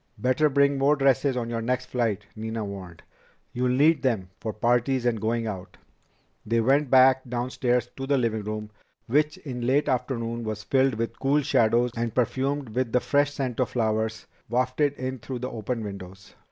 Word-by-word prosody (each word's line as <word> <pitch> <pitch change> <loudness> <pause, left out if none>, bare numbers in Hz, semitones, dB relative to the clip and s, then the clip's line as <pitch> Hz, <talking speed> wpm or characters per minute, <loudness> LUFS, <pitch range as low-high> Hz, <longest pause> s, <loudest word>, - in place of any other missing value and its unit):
"Better 130 +4 +2
bring 140 0 +3
more 140 +2 +4
dresses 135 -1 +2
on 120 -2 -2
your 115 -1 -3
next 125 +2 -1
flight," 110 -5 -1
Nina 110 0 -4
warned. 95 -4 -8 0.5
"You'll 125 +1 0
need 145 +4 +4
them 110 -9 -1
for 110 - -3
parties 120 +3 +1
and 115 -3 +1
going 115 +1 0
out." 95 -4 -6 0.7
They 115 +2 +1
went 135 +4 +2
back 130 0 +6
downstairs 125 0 0
to 135 0 -4
the 140 0 +3
living 115 -3 0
room, 105 0 -5 0.3
which 150 +5 +1
in 125 -4 -5
late 140 +3 +2
afternoon 120 -2 -2
was 110 -1 -4
filled 135 -2 +2
with 115 +1 -4
cool 140 +2 +2
shadows 120 -3 +3
and 115 -1 -2
perfumed 135 +2 0
with 120 +1 -1
the 125 - +5
fresh 145 +3 +1
scent 130 -4 -3
of 130 - +1
flowers 110 -1 -1 0.2
wafted 130 +4 +1
in 130 -1 -5
through 130 +1 -6
the 125 +1 -5
open 115 +1 -3
windows. 95 -2 -9
125 Hz, 180 wpm, -26 LUFS, 110-135 Hz, 0.7 s, back